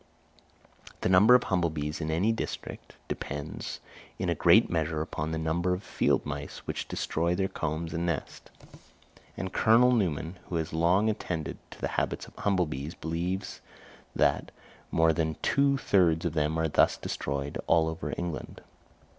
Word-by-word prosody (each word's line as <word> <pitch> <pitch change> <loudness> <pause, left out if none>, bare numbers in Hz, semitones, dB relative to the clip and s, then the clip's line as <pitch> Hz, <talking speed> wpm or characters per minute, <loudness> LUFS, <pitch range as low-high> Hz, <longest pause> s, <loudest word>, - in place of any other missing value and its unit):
The - - +1
number 100 +7 +7
of 125 - +4
humble 90 -3 +1
bees 75 0 -4
in 80 - -2
any 85 +8 +2
district 115 - -5
depends 75 +2 -5 0.4
in - - -1
a - - +3
great - - +5
measure 80 -2 -1
upon 80 0 -3
the 80 - -1
number 85 +3 0
of 95 - -8
field - - +1
mice, 75 -1 -6
which - - -4
destroy 85 +2 -1
their 95 +1 +1
combs 80 -1 -3
and 85 0 -1
nests; 85 - -4 0.9
and 95 -1 -4
Colonel 120 +3 +5
Newman, 90 -6 0
who 90 - -3
has 80 0 -2
long 90 +6 +3
attended 90 -8 -3
to - - -12
the - - -1
habits - - -2
of - - -17
humble 95 -3 +2
bees, 75 +3 -5
believes 85 +4 -3 0.5
that - - +2 0.4
"more 80 0 +3
than 80 0 -1
two 140 0 +3
thirds 85 -9 +3
of 85 - 0
them 75 0 0
are 80 0 +1
thus 75 - +3
destroyed 70 +1 -3
all 80 -1 +4
over 80 0 -4
England." 85 -3 -5
85 Hz, 165 wpm, -29 LUFS, 80-95 Hz, 0.9 s, number